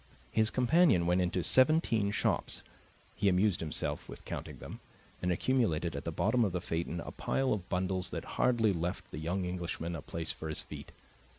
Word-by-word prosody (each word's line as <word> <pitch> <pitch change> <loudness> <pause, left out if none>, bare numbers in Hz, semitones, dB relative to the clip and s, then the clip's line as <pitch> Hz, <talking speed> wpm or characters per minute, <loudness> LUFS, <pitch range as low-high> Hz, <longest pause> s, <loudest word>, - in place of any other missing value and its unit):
His 110 0 +3
companion 130 - +4
went 90 +2 +3
into 90 0 0
seventeen 130 - +3
shops 100 - -1 0.5
he 100 -2 +2
amused 95 0 +3
himself 80 -2 -3
with - - -9
counting - - -6
them - - -9 0.4
and 90 - +1
accumulated 90 - +1
at 70 - -5
the - - -1
bottom 125 -1 +2
of 100 -5 0
the 90 - 0
phaeton 85 +1 -3
a - - -7
pile 135 -1 0
of 95 -4 -5
bundles 95 0 0
that - - -5 0.2
hardly 115 -5 +4
left 85 +1 -3
the - - -5
young 90 +4 -1
Englishman 85 -1 -3
a 80 - -5
place 80 +2 -4
for 80 - -6
his 80 - 0
feet. - - -9
90 Hz, 185 wpm, -32 LUFS, 85-110 Hz, 0.5 s, companion